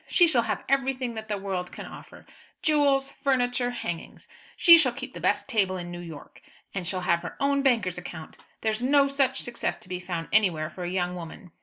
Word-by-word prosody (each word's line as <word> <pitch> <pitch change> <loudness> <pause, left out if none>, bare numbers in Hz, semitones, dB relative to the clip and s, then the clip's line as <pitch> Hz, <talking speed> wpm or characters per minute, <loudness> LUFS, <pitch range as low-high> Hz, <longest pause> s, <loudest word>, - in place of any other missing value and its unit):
She 350 - +5
shall 260 -7 +4
have - - -3
everything 265 -2 0
that 220 -1 -7
the 210 -1 -2
world 190 -2 -4
can - - -8
offer - - -12 0.4
jewels, 280 -3 +3
furniture, 245 -2 +1
hangings! 175 -8 -6 0.3
She 340 -2 +9
shall 280 -7 +3
keep 260 0 -7
the - - -8
best - - +1
table 190 -4 +1
in 175 -1 -6
New 175 - -6
York, 165 -4 -10 0.3
and 185 -3 -4
shall 185 0 -1
have 170 -1 +2
her 175 - -7
own 280 0 +2
banker's 225 -10 +1
account. 165 -2 -9 0.2
There's 220 0 0
no 280 +2 +4
such 275 -1 +1
success 240 -1 -2
to - - -15
be 180 -1 -3
found 175 -2 -4
anywhere 170 -7 +2
for 180 - -6
a - - -2
young 180 -1 -1
woman. 175 0 -9
220 Hz, 205 wpm, -27 LUFS, 180-270 Hz, 0.4 s, She